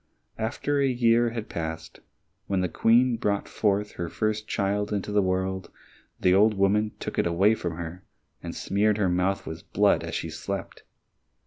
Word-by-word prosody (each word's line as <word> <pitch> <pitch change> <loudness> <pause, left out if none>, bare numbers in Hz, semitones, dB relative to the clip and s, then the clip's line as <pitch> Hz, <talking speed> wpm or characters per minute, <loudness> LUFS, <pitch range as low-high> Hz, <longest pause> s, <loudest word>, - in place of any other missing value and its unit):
After 140 +6 -1
a 140 - +3
year 120 -2 +3
had 115 -2 -5
passed, 80 -1 -5 0.5
when 95 -2 0
the 90 - +1
Queen 120 +6 +3
brought 100 -3 -1
her 100 -4 -1
first 110 +2 -2
child 100 +1 -1
into 105 0 -2
the 105 0 +3
world, 95 0 -1 0.5
the 90 - +4
old 105 +3 +5
woman 105 +2 +2
took - - -4
it - - +2
away 95 +6 +4
from 85 -6 -3
her, 85 +2 -7 0.4
and - - -6
smeared 105 +2 +1
her 100 -3 +2
mouth 90 +2 0
with 80 +4 -9
blood 105 0 +3
as - - -5
she - - -3
slept. - - -5
100 Hz, 170 wpm, -26 LUFS, 95-110 Hz, 0.5 s, old